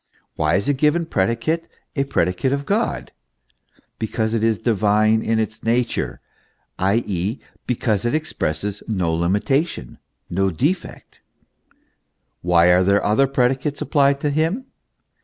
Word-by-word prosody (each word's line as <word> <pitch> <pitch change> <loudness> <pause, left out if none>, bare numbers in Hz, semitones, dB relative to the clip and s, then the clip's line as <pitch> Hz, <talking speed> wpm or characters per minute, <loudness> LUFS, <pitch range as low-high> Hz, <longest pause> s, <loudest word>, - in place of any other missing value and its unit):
Why 75 +1 +1
is 100 - 0
a 145 - +3
given 150 +5 +2
predicate 115 - 0 0.3
a 140 -2 +1
predicate 90 0 0
of 140 0 -1
God? 220 +3 -1 0.9
Because 110 0 -1
it 115 - 0
is 115 -1 +2
divine 110 0 +2
in 115 0 0
its 110 0 -2
nature; 120 +1 -1 0.6
i.e., 100 +2 0 0.3
because 110 -4 0
it 120 +5 0
expresses 100 - -3
no 90 -7 0
limitation, 100 - -1 0.3
no 95 +2 0
defect, 150 - -3 1.2
Why 90 0 +4
are 95 +3 +3
other 110 +7 +3
predicates 135 +2 0
applied 140 -2 +2
to 145 - 0
Him 165 - 0
115 Hz, 120 wpm, -21 LUFS, 95-140 Hz, 1.2 s, Why